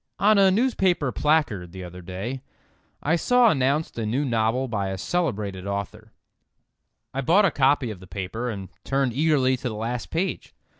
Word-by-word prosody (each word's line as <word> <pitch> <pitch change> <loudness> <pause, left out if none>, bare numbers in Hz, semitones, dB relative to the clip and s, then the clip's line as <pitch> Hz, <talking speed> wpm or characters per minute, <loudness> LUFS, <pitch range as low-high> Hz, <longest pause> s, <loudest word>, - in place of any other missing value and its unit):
ON 205 +2 +4
a 195 -1 +6
newspaper 190 - +1
placard, 120 - 0
the 95 -1 -7
other 90 +1 -9
day, 95 +9 -5 0.6
I 160 +3 +2
saw 245 +5 +4
announced 140 0 0
a - - -1
new 130 +7 0
novel 115 +1 +1
by 100 -5 -2
a 95 - -4
celebrated 100 - -2
author. 100 +2 -5 1.0
I 135 - -1
bought 180 +10 +4
a 190 - +3
copy 135 -3 +2
of 100 - -9
the 95 - -13
paper, 100 +7 -4
and 100 -5 -6
turned 135 -3 0
eagerly 140 -2 +2
to 125 0 -3
the 110 - -6
last 115 +3 -4
page. 180 +4 -3
125 Hz, 170 wpm, -24 LUFS, 100-155 Hz, 1.0 s, a